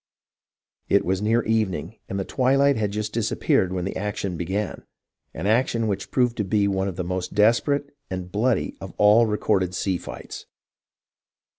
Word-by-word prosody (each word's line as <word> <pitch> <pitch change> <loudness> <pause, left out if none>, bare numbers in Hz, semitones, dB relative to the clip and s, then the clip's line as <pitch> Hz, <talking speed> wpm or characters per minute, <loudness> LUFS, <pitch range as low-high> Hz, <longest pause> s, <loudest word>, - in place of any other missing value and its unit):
It 100 - +3
was 95 +2 0
near 115 +2 +2
evening, 110 -2 -1
and 95 - -2
the 95 - -2
twilight 135 +2 +3
had 105 -2 0
just 105 +1 -3
disappeared 105 -4 +1
when 90 -1 -2
the 95 - -4
action 100 -2 -3
began, 95 +5 -3 0.2
— - - -53
an 80 - -4
action 115 +1 +2
which 95 -2 -3
proved 125 -2 +1
to 105 - 0
be 100 +1 +1
one 95 -1 0
of 95 - -4
the 90 - -3
most 90 +2 -4
desperate 140 +7 +2
and 90 -1 -5
bloody 115 +5 0
of - - -8
all 105 +3 +6
recorded 95 -3 0
sea 90 -1 -1
fights. - - -9
105 Hz, 170 wpm, -24 LUFS, 95-115 Hz, 0.2 s, all